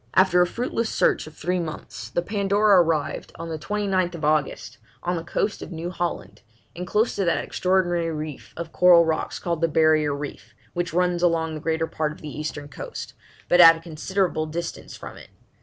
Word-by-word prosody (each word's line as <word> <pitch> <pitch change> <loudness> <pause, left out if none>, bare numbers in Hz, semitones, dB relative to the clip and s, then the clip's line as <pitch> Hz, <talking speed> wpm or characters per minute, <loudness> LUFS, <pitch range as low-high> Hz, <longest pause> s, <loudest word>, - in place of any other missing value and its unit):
After 185 -2 +5
a 180 - +4
fruitless 230 +2 -2
search - - +1
of 155 - -12
three 180 +2 -1
months, 160 -2 -6
the 175 - -1
Pandora 200 0 +4
arrived, 160 -3 -1
on 165 0 -6
the 160 -1 -4
29th 185 -4 -1
August, 150 -1 0 0.2
on 175 +1 0
the 165 - -4
coast 205 +4 -2
of - - -8
New 170 +1 -5
Holland, 175 -1 -4 0.3
and 180 +1 -5
close 215 +5 +1
to 195 - 0
that 170 - +2
extraordinary 175 -2 0
reef 155 -2 -6
of 170 -1 -5
coral 175 -2 +6
rocks 160 -1 -1
called 170 -2 -3
the 165 - +4
'Barrier 155 -2 +3
Reef,' 145 0 -8 0.2
which 175 0 -2
runs 180 0 +1
along 165 -2 +1
the 155 - -6
greater 160 0 0
part 155 -1 -2
of 150 - -12
the 150 -2 -7
eastern 150 -1 -5
coast, 145 - -8 0.3
but 175 0 +6
at 165 -1 +10
a - - -10
considerable 165 0 -1
distance 170 +2 -6
from - - -10
it. - - -13
170 Hz, 190 wpm, -24 LUFS, 155-180 Hz, 0.3 s, at